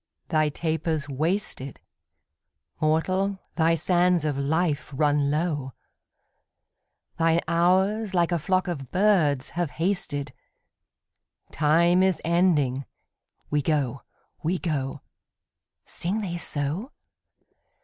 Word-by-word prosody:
'Thy 155 -2 +2
taper's 160 -1 -2
wasted; 150 - -2 1.0
Mortal, 185 +6 +1 0.2
thy 165 0 +3
sands 175 -1 +2
of 150 -2 0
life 150 +2 0
run 145 0 +2
low; 145 -4 -1 1.5
Thine 165 0 +3
hours 190 +5 +2
like 175 0 +2
a 170 - +1
flock 185 +4 0
of 140 -8 -4
birds 175 -9 +2
have 175 -2 -2
hasted: 145 -6 -1 1.2
Time 170 +4 +3
is 190 -2 +2
ending; 155 -7 +2 0.7
we 150 0 +2
go, 140 -4 -1 0.4
we 175 +3 0
go.' 145 -5 -3 0.8
Sing 195 +6 -2
they 175 -4 -3
so? 160 - -1
165 Hz, 100 wpm, -25 LUFS, 145-180 Hz, 1.5 s, thy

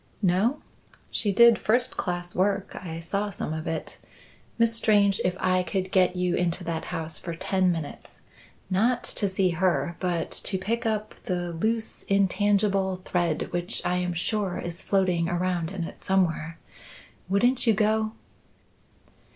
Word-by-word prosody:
"No? 200 +10 +2 0.5
She 205 - 0
did 235 +3 +6
first 245 +3 +1
class 175 -1 -3
work. 195 +1 0
I 165 -2 -5
saw 200 +5 -2
some 175 -5 -4
of 160 0 -5
it. 160 -1 -4 0.6
Miss 230 -1 +3
Strange, 205 -3 +3
if 180 0 0
I 185 0 +2
could 185 +1 -2
get 185 -1 +3
you 180 -1 0
into 175 +1 0
that 165 -2 -3
house 160 0 -3
for 170 -2 -5
ten 185 +1 +1
minutes 160 -4 -6 0.5
not 230 +7 +1
to 200 - 0
see 190 -1 +1
her 170 -1 0
but 175 -3 -1
to 190 - -1
pick 225 +5 -2
up 215 -1 -2
the 175 -2 -2
loose 220 +6 -2
intangible 195 -1 +2
thread 170 -3 -1
which 175 0 -2
I 180 - +1
am 180 -1 -1
sure 195 +2 -1
is 175 +1 -4
floating 180 -4 +1
around 175 -2 -1
in 190 -3 -3
it - - -8
somewhere 165 -4 0 0.7
wouldn't 240 +6 +2
you 225 - +5
go?" 215 +1 +1
185 Hz, 150 wpm, -26 LUFS, 175-205 Hz, 0.7 s, did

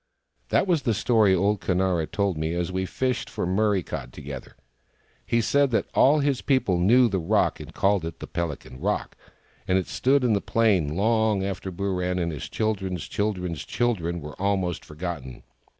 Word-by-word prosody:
That - - +3
was 175 -6 +2
the 115 -4 0
story 105 -2 +3
old 100 +3 +1
Conara 90 -3 +1
told 100 -3 0
me, 80 +2 -2
as 90 +1 -2
we 95 0 -2
fished 130 +2 -2
for - - -3
Murray 100 +1 +1
cod 65 -4 -6
together. 70 -1 -9 0.7
He 115 - +2
said 140 +5 +3
that 115 - 0
all 145 +3 +5
his 140 -2 0
people 120 -10 +1
knew 120 +8 +5
the 100 -4 -1
rock, 80 - +1
and - - -9
called 100 -2 +1
it 80 0 -6
the - - -6
Pelican 75 -7 -5
Rock; - - -2 0.5
and 95 - +3
it 95 - 0
stood 135 +1 +2
on 115 - +3
the 100 - +1
plain 95 -10 +2
long 110 0 +2
after 95 -1 -4
Booran 90 -1 -1
and 85 -1 -1
his 75 - -6
children's 95 -6 -2
children's 90 -7 -2
children 85 -8 -1
were 75 +5 -9
almost 95 -3 0
forgotten. 75 -5 -6
95 Hz, 180 wpm, -25 LUFS, 85-110 Hz, 0.7 s, all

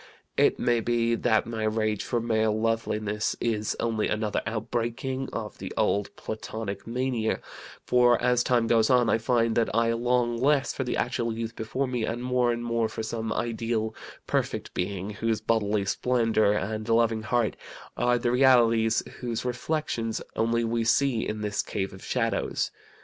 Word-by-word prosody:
It - - +3
may 120 -1 +2
be 115 0 +1
that 115 -1 +2
my 115 -2 -4
rage 110 -1 0
for 120 - -1
male 110 -2 +1
loveliness 110 -2 -1
is 110 -2 -1
only 110 -2 0
another 110 -1 -1
outbreaking 120 +4 -2
of 110 -2 -6
the - - -6
old 100 0 +1
Platonic 110 -2 -6
mania, 120 -2 -1 0.5
for 125 -1 +4
as 125 -1 +2
time 120 -2 +2
goes 115 -1 +3
on 125 -3 +4
I 115 - +3
find 115 -1 +1
that 115 - +2
I 115 0 +3
long 120 0 +1
less 140 +1 +2
for 130 - -2
the 125 - -2
actual 120 -1 -1
youth 115 +1 -4
before 110 +5 -2
me, 125 -2 -2
and 115 +2 -2
more 125 -1 +2
and 120 0 -3
more 115 -1 0
for 110 - -5
some 110 0 -3
ideal, 115 -1 -1 0.3
perfect - - -2
being 95 +2 -3
whose 110 +1 -1
bodily 105 -2 +1
splendor 115 -1 +2
and 110 +2 -2
loving 115 -1 +3
heart 115 0 0 0.4
are 120 0 +2
the 120 0 0
realities 115 -3 +4 0.2
whose 120 -1 -3
reflections 125 -3 -2 0.2
only 115 +1 +1
we 115 0 0
see 120 0 +2
in 105 0 -3
this 105 -1 -1
cave 95 -2 -3
of 95 - -12
shadows. - - -1
115 Hz, 165 wpm, -27 LUFS, 110-120 Hz, 0.5 s, for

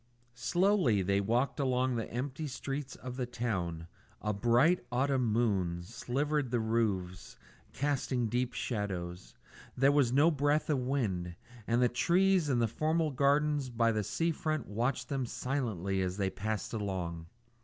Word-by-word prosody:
Slowly 175 - +2
they 100 +2 +2
walked 120 +8 0
along 130 -1 +1
the 115 - -3
empty 135 +5 -3
streets 135 +1 -5
of 125 0 -8
the 125 -2 -2
town; 95 -9 -3 0.3
a 105 0 -1
bright 120 - +3
autumn 130 -2 +1
moon 95 -7 +1
silvered 130 +7 -1
the 120 0 +1
roofs, 105 -5 -1 0.3
casting 135 -3 -1
deep 125 +2 0
shadows; 95 -7 -4 0.4
there 135 +2 +5
was 140 -4 +3
no 145 +6 +5
breath 145 +1 +1
of 140 - +2
wind; 105 -10 -1 0.3
and 120 +2 +3
the - - +5
trees 175 +6 +2
in 130 - +2
the 115 -1 +2
formal 155 +6 0
gardens 145 +1 +2
by 115 -1 +2
the 110 -1 0
sea 165 - 0
front 155 -4 -2
watched 125 +4 -1
them 135 -3 -2
silently 110 -9 -2
as 90 0 -2
they 95 -2 0
passed 105 +4 -3
along. 90 -6 -3
125 Hz, 150 wpm, -32 LUFS, 105-140 Hz, 0.4 s, there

